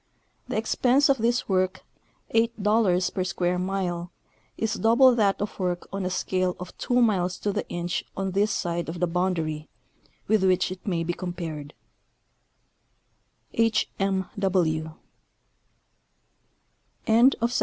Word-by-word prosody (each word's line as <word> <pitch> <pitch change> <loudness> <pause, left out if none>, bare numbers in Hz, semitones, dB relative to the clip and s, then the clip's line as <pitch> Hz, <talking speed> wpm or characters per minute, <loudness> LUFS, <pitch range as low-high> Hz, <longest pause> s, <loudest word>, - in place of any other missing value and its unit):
The - - -2
expense 250 +5 +3
of 270 -2 +3
this 235 +2 +1
work, 185 -1 0 0.5
eight 230 0 +1
dollars 205 -4 +2
per 185 - -1
square 180 -1 -1
mile, 180 -2 -2 0.5
is 225 0 -1
double 235 +4 +5
that 205 -4 +2
of 205 0 -4
work 180 -2 -2
on 195 -1 -2
a - - -1
scale 185 0 -1
of 180 0 -8
2 245 0 +2
miles 185 -5 +1
to 205 - -2
the 210 - -3
inch 175 0 -2
on 195 0 -1
this 200 +3 +2
side 170 -4 -2
of 170 +1 -5
the 180 - +2
boundary, 165 -3 -2 0.6
with 215 -2 +3
which 185 -1 +2
it 185 - -8
maj^ 170 -5 -1
be 175 - -1
compared. 165 -5 -6 1.8
H. 225 -2 +1
M. 195 -1 0
185 Hz, 130 wpm, -26 LUFS, 175-215 Hz, 1.8 s, double